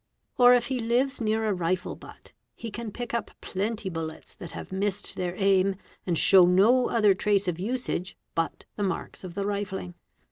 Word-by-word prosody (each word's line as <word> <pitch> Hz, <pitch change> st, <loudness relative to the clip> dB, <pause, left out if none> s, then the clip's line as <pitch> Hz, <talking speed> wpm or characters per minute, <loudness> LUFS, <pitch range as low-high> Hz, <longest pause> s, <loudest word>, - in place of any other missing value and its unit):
Or 245 Hz, 0 st, +8 dB
if 240 Hz, -1 st, +1 dB
he 260 Hz, 0 st, -2 dB
lives 245 Hz, +4 st, 0 dB
near 220 Hz, 0 st, +1 dB
a 210 Hz, -, +2 dB
rifle 180 Hz, 0 st, -1 dB
butt, -, -, -14 dB, 0.2 s
he 230 Hz, -, -7 dB
can 230 Hz, 0 st, -6 dB
pick 240 Hz, +2 st, -6 dB
up 235 Hz, -2 st, -2 dB
plenty 210 Hz, +2 st, -3 dB
bullets 160 Hz, -3 st, -6 dB
that 170 Hz, -, -9 dB
have -, -, -8 dB
missed 195 Hz, +1 st, -2 dB
their 180 Hz, -1 st, -3 dB
aim 195 Hz, -1 st, +3 dB, 0.3 s
and 170 Hz, -2 st, +1 dB
show 185 Hz, +1 st, +7 dB
no 220 Hz, +8 st, +4 dB
other 210 Hz, -4 st, +4 dB
trace 200 Hz, 0 st, +1 dB
of 175 Hz, -1 st, -1 dB
usage 205 Hz, -3 st, -3 dB, 0.2 s
but 165 Hz, 0 st, -2 dB
the -, -, -4 dB
marks 190 Hz, 0 st, -4 dB
of 175 Hz, -2 st, -8 dB
the 200 Hz, -, -2 dB
rifling. 200 Hz, -3 st, -3 dB
200 Hz, 185 wpm, -27 LUFS, 185-230 Hz, 0.3 s, Or